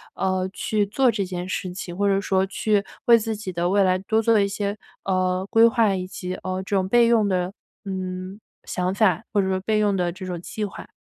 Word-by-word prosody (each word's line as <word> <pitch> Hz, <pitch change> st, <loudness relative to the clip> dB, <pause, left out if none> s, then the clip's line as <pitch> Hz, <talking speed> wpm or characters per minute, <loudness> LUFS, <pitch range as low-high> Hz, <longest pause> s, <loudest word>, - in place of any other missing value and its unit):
呃， 185 Hz, -1 st, 0 dB
去 210 Hz, 0 st, 0 dB
做 245 Hz, +5 st, +2 dB
这 205 Hz, -3 st, -2 dB
件 180 Hz, -1 st, -5 dB
事 185 Hz, -1 st, -3 dB
情， 180 Hz, -1 st, -7 dB
或 205 Hz, +1 st, +2 dB
者 195 Hz, 0 st, +2 dB
说 190 Hz, -1 st, +1 dB
去 200 Hz, +1 st, 0 dB, 0.2 s
为 235 Hz, -2 st, +7 dB
自 220 Hz, 0 st, -3 dB
己 205 Hz, -3 st, -6 dB
的 175 Hz, 0 st, -1 dB
未 200 Hz, +1 st, +4 dB
来 185 Hz, -1 st, +3 dB
多 220 Hz, +4 st, 0 dB
做 225 Hz, -1 st, +4 dB
一 200 Hz, -, +2 dB
些， 200 Hz, +1 st, -3 dB, 0.3 s
呃， 185 Hz, -1 st, 0 dB
规 225 Hz, +1 st, +6 dB
划 230 Hz, -4 st, +3 dB
以 185 Hz, -1 st, -4 dB
及， 185 Hz, 0 st, -5 dB
呃， 185 Hz, 0 st, -4 dB
这 200 Hz, +1 st, -2 dB
种 185 Hz, -1 st, 0 dB
备 235 Hz, +3 st, +5 dB
用 225 Hz, -3 st, +3 dB
的， 180 Hz, -1 st, 0 dB, 0.3 s
嗯， 185 Hz, 0 st, -5 dB, 0.2 s
想 180 Hz, 0 st, -2 dB
法 195 Hz, -5 st, +2 dB
或 205 Hz, -, +3 dB
者 190 Hz, -, -1 dB
说 190 Hz, 0 st, 0 dB
备 215 Hz, +3 st, 0 dB
用 205 Hz, -2 st, +2 dB
的 175 Hz, -1 st, 0 dB
这 185 Hz, +1 st, -8 dB
种 180 Hz, -2 st, -4 dB
计 215 Hz, +4 st, -5 dB
划。 205 Hz, -, -6 dB
195 Hz, 245 characters per minute, -23 LUFS, 185-210 Hz, 0.3 s, 为